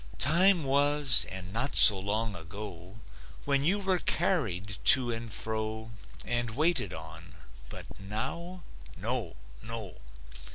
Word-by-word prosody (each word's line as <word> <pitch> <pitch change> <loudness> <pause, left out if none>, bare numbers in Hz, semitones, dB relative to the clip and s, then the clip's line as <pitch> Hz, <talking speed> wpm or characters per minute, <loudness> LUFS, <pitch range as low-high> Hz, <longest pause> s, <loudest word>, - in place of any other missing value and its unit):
Time 175 +4 +3
was, 140 -1 +3
and 95 0 -8
not 125 +6 -2
so 100 -3 +9
long 105 +2 -3
ago, 90 +1 -10 0.5
When 140 -1 +1
you 180 +7 +4
were 190 -2 -1
carried 100 - -2
to 125 -3 +5
and 115 -1 -6
fro 110 +1 -5 0.3
And 120 -1 -1
waited 155 - 0
on, 80 0 -11 0.3
but - - -9
now? 160 - -7 0.3
No! 110 - -4 0.3
No! 110 -5 -7
115 Hz, 120 wpm, -28 LUFS, 100-145 Hz, 0.5 s, so